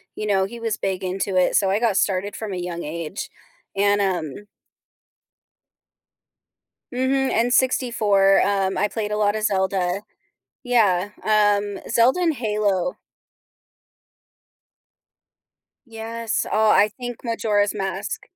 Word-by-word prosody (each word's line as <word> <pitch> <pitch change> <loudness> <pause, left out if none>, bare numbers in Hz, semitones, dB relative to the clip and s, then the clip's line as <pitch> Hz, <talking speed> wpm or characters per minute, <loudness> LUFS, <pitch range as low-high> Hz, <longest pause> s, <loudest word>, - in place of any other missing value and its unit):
you 215 - -4
know, 195 -2 +2
he 235 +4 -8
was 225 -1 -2
big 190 -1 -3
into 185 +1 -2
it, 185 - +3
so 195 -2 +3
I 200 - +1
got 225 -4 +1
started 195 +1 0
from 215 -3 -5
a - - -4
young 175 -1 -5
age 165 +5 -5 0.5
and, 205 +1 +2
um 185 -1 -3 2.5
Mhm, 260 -2 +1
N64, 215 -7 +3
um, 195 -1 0
I 210 - +2
played 210 0 -4
a 210 - -1
lot 205 0 +2
of 215 - -3
Zelda. 190 -2 0 0.6
Yeah, 205 -6 +2
um, 205 -2 +2
Zelda 240 +8 +3
and 330 -3 +2
Halo 210 -2 -1 2.9
Yes, 225 0 -3
oh, 215 0 +4
I 210 +1 +5
think 245 +1 -8
Majora's 210 -3 0
Mask. 195 -1 -3
205 Hz, 120 wpm, -22 LUFS, 195-225 Hz, 2.9 s, I